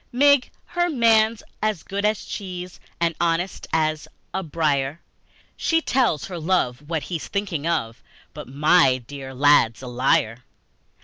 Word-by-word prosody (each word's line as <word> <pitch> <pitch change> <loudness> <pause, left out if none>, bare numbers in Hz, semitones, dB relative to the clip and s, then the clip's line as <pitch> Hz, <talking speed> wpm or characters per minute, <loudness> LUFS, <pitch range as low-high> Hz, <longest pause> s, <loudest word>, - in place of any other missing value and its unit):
Mig, 285 +1 +4 0.2
her 350 0 0
man's 225 -5 +3 0.2
as 215 -6 -1
good 200 +1 -4
as 210 0 0
cheese 180 -2 -7 0.2
And 170 0 +1
honest 170 +2 -1
as 155 -1 0 0.3
a 190 - -1
briar, 150 -3 -1 0.6
She 325 - +1
tells 250 - +1
her 180 -3 -6
love 150 -5 -1
what 160 -3 -1
he's 170 -4 -5
thinking 190 -7 -3
of, 115 -9 -2 0.3
But - - -9
my 140 0 +4
dear 135 0 -8
lad's 135 -4 +4
a - - -6
liar! 120 -1 +1
165 Hz, 140 wpm, -23 LUFS, 140-200 Hz, 0.6 s, Mig